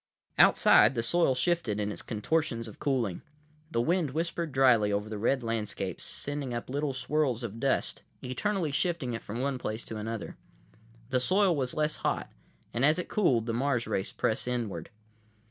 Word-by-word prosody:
———— - - -18
Outside, 135 - +5
the 115 - 0
soil 165 -1 +2
shifted 125 - +1
in 105 0 -1
its - - -6
contortions 115 +1 -1
of 110 - -11
cooling. 125 -10 -1 0.5
The 115 -7 0
wind 170 +1 +1
whispered 165 +2 -2
dryly 125 -6 +4
over 100 +1 -1
the 110 -1 -5
red 130 +4 +1
landscape, 105 -5 -3
sending 145 -4 -4
up 120 +2 -5
little 145 0 -1
swirls 130 -3 0
of 115 -1 -5
dust, 135 +1 +1 0.2
eternally 165 +6 -1
shifting 140 -4 -1
it 115 - -4
from 115 +4 -5
one 135 -1 -1
place 110 0 -4
to 110 - -6
another. 110 0 -5 0.7
The 130 - +3
soil 185 +6 +3
was 130 -3 -1
less 155 0 0
hot, - - -2 0.4
and 120 - 0
as 155 +4 +5
it 180 - -4
cooled, 130 - +2
the 115 - -2
Mars 125 0 0
race 95 - -2
pressed 110 - 0
inward. 110 -9 -3
125 Hz, 180 wpm, -29 LUFS, 115-150 Hz, 0.7 s, Outside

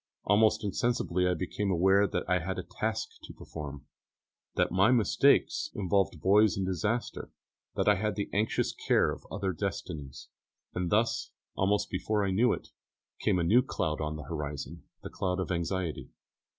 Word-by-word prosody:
Almost 105 +2 +3
insensibly 100 -4 0
I 90 - +2
became 100 +4 -2
aware 95 +3 +4
that - - -3
I 90 0 +2
had 95 +3 -4
a 95 - -3
task 110 +3 -3
to - - -10
perform, 70 -2 -8 0.7
that - - +1
my 95 +4 +4
mistakes 130 +5 +3
involved 95 -4 +1
boys 105 +2 +5
in 95 - -1
disaster, 105 +6 -2 0.5
that - - 0
I 105 -1 +5
had 105 -1 0
the 100 - -2
anxious 105 +3 0
care - - +2
of - - -9
other 95 -2 -2
destinies; 80 -7 -5 0.4
and 90 -1 -2
thus, 115 +3 +1 0.2
almost 100 +1 +1
before 105 -2 0
I 95 - 0
knew 115 +6 +3
it, - - -4 0.5
came - - +2
a 85 - +1
new 110 +9 +5
cloud 80 -12 -2
on 75 0 -2
the 75 - -7
horizon, 70 0 -6 0.2
the - - -7
cloud 90 0 -2
of 95 - -2
anxiety. 85 -1 -2
95 Hz, 165 wpm, -30 LUFS, 85-105 Hz, 0.7 s, boys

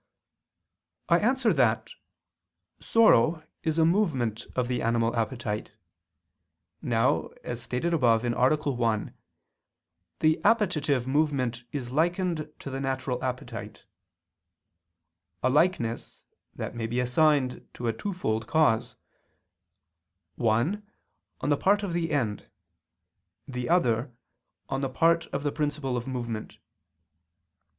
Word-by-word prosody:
I 170 0 +5
answer 240 -1 +2
that, 115 -5 +2 0.9
Sorrow 165 - +4 0.2
is 160 0 -1
a 160 - +5
movement 140 - 0
of 125 -1 0
the 125 0 -1
animal 115 0 +1
appetite. 115 -3 -3 1.1
Now, 115 -8 +1 0.2
as 120 -1 -5
stated 125 +9 -2
above 120 -6 +3
(A. 120 - +1 0.3
1), 120 -7 -1 1.1
the 155 0 +3
appetitive 165 - +2
movement 130 -4 0
is 125 -4 -4
likened 165 0 0
to 140 - -8
the 135 - -3
natural 130 -2 -2
appetite; 130 0 -5 1.6
a 130 - +3
likeness, 145 -7 0 0.3
that - - -5
may 115 -2 -3
be 120 +2 -1
assigned 130 +1 +2
to 120 - -4
a 115 - +1
twofold 115 - -2
cause; 120 -7 +2 1.4
one, 120 - +1 0.6
on - - -1
the 145 - +3
part 205 +5 +2
of 190 -4 -3
the 170 -1 -1
end, 115 -9 -1 1.0
the 125 -1 -4
other, 125 -7 +2 0.6
on 135 0 -2
the 135 - -1
part 165 +5 +2
of 140 - -4
the 145 - 0
principle 145 -3 -2
of 120 +1 -3
movement. 120 -4 -5
130 Hz, 115 wpm, -27 LUFS, 120-160 Hz, 1.6 s, I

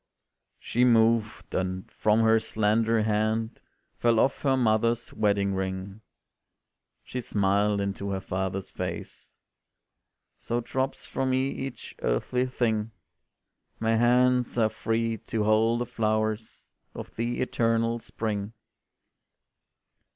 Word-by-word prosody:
She 120 - 0
moved, 115 -2 +2
and 95 0 -2
from 110 +1 +2
her 110 0 +5
slender 110 +1 +1
hand 110 +1 0 0.4
Fell 115 -2 +3
off 135 - +2
her 135 -2 +2
mother's 115 0 +1
wedding 100 -2 +1
ring; 95 +2 -4 1.0
She 125 - -5
smiled 100 -1 +1
into 100 0 -3
her 95 -1 -1
father's 95 +1 -3
face - - -7 1.0
"So 120 - -2
drops 130 +3 -3
from 135 0 -2
me 130 +1 +1
each 135 -1 -6
earthly 125 - 0
thing; 115 -4 0 0.9
My 115 0 +2
hands 125 +1 +3
are 110 -2 +3
free 115 +1 -1
to 110 +1 -3
hold 110 +2 +3
the - - 0
flowers 110 -2 -2 0.2
Of - - -8
the 120 +1 -2
eternal 115 -1 +1
spring." 110 -2 -4
110 Hz, 115 wpm, -27 LUFS, 105-120 Hz, 1.0 s, her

